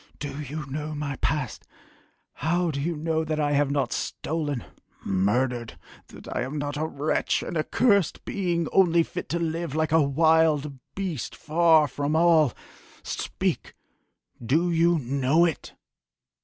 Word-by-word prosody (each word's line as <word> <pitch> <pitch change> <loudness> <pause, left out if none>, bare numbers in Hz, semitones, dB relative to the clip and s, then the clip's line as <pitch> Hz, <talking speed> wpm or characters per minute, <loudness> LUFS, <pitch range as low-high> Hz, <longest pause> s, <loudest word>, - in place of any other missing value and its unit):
Do 145 0 -5
you 150 +1 -5
know 150 +3 -5
my 145 -2 -3
past?... 145 -6 -2 0.7
How 175 +2 0
do 140 -1 -3
you 170 +3 -1
know 160 +1 -1
that 155 -1 -2
I 145 -1 +1
have 145 -1 +2
not 140 -4 0
stolen, 145 -6 -3 0.4
murdered 115 +5 0 0.3
that - - -13
I - - 0
am 135 +4 -4
not 145 0 -3
a 155 +2 -1
wretch 150 0 0
an - - -5
accursed 200 +4 +2
being 175 -4 -1
only 170 -3 +4
fit - - -7
to 170 - 0
live 165 -2 -2
like 155 -1 0
a 160 0 +5
wild 150 -1 +2 0.2
beast 180 - -4
far 160 -1 +4
from 145 +3 -2
all 160 -4 +5 0.5
speak - - -3 0.7
do 160 +9 +2
you 170 +1 +3
know 140 +4 +2
it?" 165 -4 -4
155 Hz, 145 wpm, -26 LUFS, 140-165 Hz, 0.7 s, a